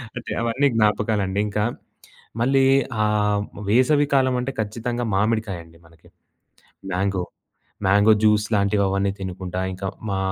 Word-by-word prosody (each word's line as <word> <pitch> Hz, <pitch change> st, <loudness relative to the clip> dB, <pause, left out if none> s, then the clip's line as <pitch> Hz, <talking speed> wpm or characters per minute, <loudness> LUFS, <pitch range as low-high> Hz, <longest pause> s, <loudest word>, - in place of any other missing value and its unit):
అంటే, 125 Hz, -, -6 dB
అవన్నీ 120 Hz, +5 st, +1 dB
జ్ఞాపకాలండి. 105 Hz, -2 st, +1 dB
ఇంకా 105 Hz, 0 st, -1 dB, 0.8 s
మళ్ళీ 135 Hz, +2 st, +3 dB, 0.4 s
ఆహ్, 105 Hz, -1 st, +1 dB, 0.3 s
వేసవి 130 Hz, +6 st, +4 dB
కాలం 130 Hz, -1 st, +3 dB
అంటే 130 Hz, +2 st, -3 dB
ఖచ్చితంగా 120 Hz, +3 st, -3 dB
మామిడికాయండి, 95 Hz, -6 st, -2 dB
మనకి. 85 Hz, -1 st, -21 dB, 0.8 s
మ్యాంగో, 95 Hz, 0 st, -1 dB, 0.6 s
మ్యాంగో 100 Hz, +3 st, +5 dB
జ్యూస్ 105 Hz, -1 st, +3 dB
లాంటివి 100 Hz, 0 st, +2 dB
అవన్నీ 100 Hz, 0 st, 0 dB
తినుకుంటా, 95 Hz, -1 st, -5 dB
ఇంకా 95 Hz, +1 st, -6 dB, 0.2 s
మా 95 Hz, -, -1 dB
105 Hz, 115 wpm, -22 LUFS, 95-115 Hz, 0.8 s, మ్యాంగో